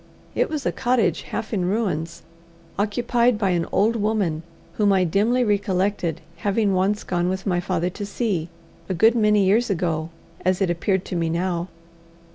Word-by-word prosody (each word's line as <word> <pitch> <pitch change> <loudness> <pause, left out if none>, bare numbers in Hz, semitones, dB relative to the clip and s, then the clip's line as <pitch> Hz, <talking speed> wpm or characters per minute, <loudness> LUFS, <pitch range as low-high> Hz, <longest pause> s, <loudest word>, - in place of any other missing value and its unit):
It - - +1
was 300 -4 -3
a - - +2
cottage 235 -9 +1
half 220 - -5
in 190 -4 0
ruins, 175 -5 -2 0.6
occupied 235 +3 +2
by 200 -3 +1
an 170 -2 0
old 220 +4 +2
woman 205 -7 0 0.3
whom 205 -2 +2
I 190 -1 +3
dimly 210 +8 +2
recollected 195 -5 0 0.2
having 200 +2 +1
once 195 +3 +1
gone 175 0 0
with 190 +1 -3
my 180 -3 +1
father 175 0 -1
to 205 +3 -6
see 195 -7 -2 0.4
a 185 - -1
good 220 +7 +5
many 210 -3 +3
years 220 +5 +3
ago, 165 -4 -1 0.3
as 185 0 +1
it 190 -3 +1
appeared 185 +2 0
to - - -5
me 165 -1 0
now. 170 +1 -1
195 Hz, 170 wpm, -23 LUFS, 175-215 Hz, 0.6 s, good